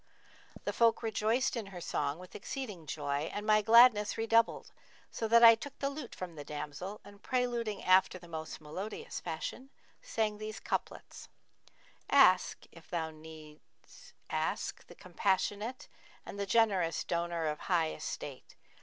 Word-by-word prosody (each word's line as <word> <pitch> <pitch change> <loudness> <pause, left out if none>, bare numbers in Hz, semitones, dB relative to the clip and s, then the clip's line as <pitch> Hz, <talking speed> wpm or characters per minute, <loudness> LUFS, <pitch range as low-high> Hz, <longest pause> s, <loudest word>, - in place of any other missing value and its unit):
The - - -2
folk 230 0 +3
rejoiced 225 +3 +1
in 225 -4 -4
her 190 -2 -8
song 150 -3 -2
with 180 +1 -13
exceeding 205 - -6
joy 145 +1 -2
and 205 - -5
my 215 0 +4
gladness 220 -1 +6
redoubled, 225 0 +2 0.4
so 225 - -3
that 235 +1 +6
I 230 0 +11
took 275 +5 -7
the 275 0 -1
lute 280 -3 -8
from 180 -2 -6
the 150 -2 -8
damsel 150 +7 -6
and 205 0 -14
preluding 240 -5 -1
after 185 0 +4
the 175 -1 -14
most 160 -1 -6
melodious 180 +8 -6
fashion, 175 +10 -5 0.3
sang 220 - -2
these 215 0 -6
couplets, - - -5 0.8
'Ask - - +4
(if - - -17
needs 155 -7 -9 0.2
thou - - -2
ask) - - -2
the - - -13
Compassionate, 205 +6 -1 0.2
* - - -26
And 200 - -8
the 200 - -2
generous 195 -7 +2
donor 170 -1 -2
of 150 -1 -2
high 165 -3 +1
estate. - - -7
200 Hz, 150 wpm, -32 LUFS, 160-225 Hz, 0.8 s, I